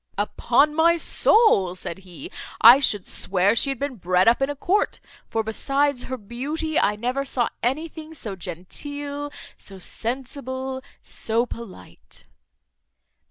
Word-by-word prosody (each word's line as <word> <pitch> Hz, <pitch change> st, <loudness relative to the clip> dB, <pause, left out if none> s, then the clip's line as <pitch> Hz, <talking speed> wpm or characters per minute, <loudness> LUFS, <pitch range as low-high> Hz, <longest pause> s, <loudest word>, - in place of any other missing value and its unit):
"Upon 240 Hz, +7 st, +2 dB
my 335 Hz, +2 st, +4 dB
soul," 320 Hz, -, +4 dB
said 180 Hz, 0 st, -6 dB
he, 190 Hz, -, -10 dB, 0.3 s
"I 240 Hz, +4 st, +10 dB
should 205 Hz, -9 st, +1 dB
swear 195 Hz, +2 st, +1 dB
she 275 Hz, -, +3 dB
had 270 Hz, -, -2 dB
been 275 Hz, -1 st, -4 dB
bred 185 Hz, +1 st, +2 dB
up 235 Hz, +3 st, +5 dB
in 270 Hz, -, +2 dB
a 290 Hz, -, -3 dB
court; 375 Hz, +8 st, 0 dB, 0.3 s
for 225 Hz, -, 0 dB
besides 275 Hz, +4 st, 0 dB
her 260 Hz, -, -4 dB
beauty, 285 Hz, +9 st, -2 dB
I 210 Hz, -, +2 dB
never 250 Hz, +5 st, -1 dB
saw 255 Hz, -3 st, 0 dB
anything 315 Hz, +5 st, -3 dB
so 210 Hz, -9 st, -5 dB
genteel, 285 Hz, -, -5 dB, 0.3 s
so 195 Hz, -, -7 dB
sensible, 260 Hz, +5 st, -3 dB, 0.2 s
so 230 Hz, +2 st, 0 dB
polite." 230 Hz, -5 st, -11 dB
255 Hz, 135 wpm, -24 LUFS, 210-290 Hz, 0.3 s, I